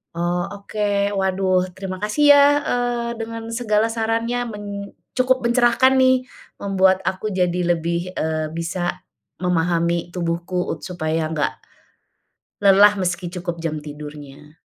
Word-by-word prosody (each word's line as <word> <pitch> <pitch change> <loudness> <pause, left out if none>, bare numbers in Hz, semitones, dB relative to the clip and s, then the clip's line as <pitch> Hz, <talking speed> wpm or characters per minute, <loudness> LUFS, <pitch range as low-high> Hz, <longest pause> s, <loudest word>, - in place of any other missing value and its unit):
Oh, 175 +1 0
oke. 200 +1 -8 0.4
Waduh, 185 -1 +1
terima 190 +1 -6
kasih 290 +7 +5
ya, 285 - +7 0.3
eee, 245 -1 -1
dengan 225 0 -6
segala 225 -2 +1
sarannya 230 +2 -1
men 205 -1 -8 0.5
cukup 255 0 +2
mencerahkan 240 +2 +3
nih, 260 -1 +3 0.3
membuat 190 -1 +3
aku 200 +3 -2
jadi 180 -2 0 0.2
lebih, 170 +2 -3
eee, 155 -2 -2
bisa 170 +2 -3 0.4
memahami 170 -1 0
tubuhku 170 -1 -3
supaya 160 -3 -2
nggak 155 -2 0 1.0
lelah, 205 +1 +6
meski 180 -2 -2
cukup 175 -1 -5
jam 160 -2 -2
tidurnya. 150 0 -10
185 Hz, 120 wpm, -21 LUFS, 170-225 Hz, 1.0 s, ya